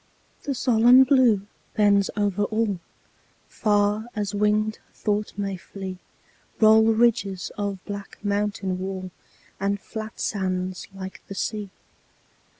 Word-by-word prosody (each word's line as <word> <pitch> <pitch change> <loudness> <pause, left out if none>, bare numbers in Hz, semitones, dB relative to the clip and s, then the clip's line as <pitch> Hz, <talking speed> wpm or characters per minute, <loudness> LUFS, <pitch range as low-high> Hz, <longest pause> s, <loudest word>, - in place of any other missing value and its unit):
The 275 - -3
solemn 245 +1 +6
Blue 250 -7 +4 0.3
bends 205 -2 +4
over 205 -1 +1
all; 215 -3 -1 0.7
Far 210 +1 +1
as 205 -1 -2
winged 210 +1 +1
thought 210 -1 -2
may 195 -2 -2
flee 190 0 -8 0.6
Roll 220 0 +7
ridges 220 -4 +2
of 200 -2 -4
black 200 -1 -7
mountain 200 -2 -1
wall, 185 -1 -5 0.5
And 200 +1 0
flat 215 +1 -7
sands 185 -2 -2
like 190 0 -8
the 195 - -7
sea. 210 0 -3
205 Hz, 115 wpm, -24 LUFS, 195-215 Hz, 0.7 s, Roll